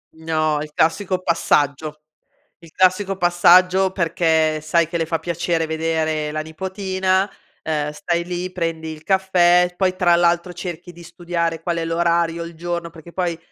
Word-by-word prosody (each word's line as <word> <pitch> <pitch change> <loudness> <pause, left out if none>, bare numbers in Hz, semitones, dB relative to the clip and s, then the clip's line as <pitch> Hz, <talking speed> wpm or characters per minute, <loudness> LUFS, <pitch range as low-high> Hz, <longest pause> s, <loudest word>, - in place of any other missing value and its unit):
No, 155 -2 -1
il 150 0 -7
classico 185 +3 +1
passaggio. 150 -2 0 0.6
Il 165 -3 -16
classico 190 +1 +2
passaggio 185 +1 +4
perché 160 -3 +1
sai 160 +2 +1
che 170 0 -3
le 165 - -1
fa 165 0 -1
piacere 170 -1 -1
vedere 160 -1 -1
la 155 - -2
nipotina. 190 +3 -1 0.3
Ehm, 150 -2 -2
stai 170 +2 -2
lì 180 +1 -4
prendi 165 -3 -3
il 155 - -11
caffè 180 -2 +3
poi 185 -1 0
tra 175 -2 +3
l'altro 175 +1 +1
cerchi 175 0 -7
di 170 - -14
studiare 170 -1 -3
qual 170 -1 -2
è 165 - -2
l'orario, 170 0 0
il 170 0 -8
giorno, 170 0 -4
perché 170 +1 -14
poi 175 -3 -2
170 Hz, 155 wpm, -20 LUFS, 160-180 Hz, 0.6 s, passaggio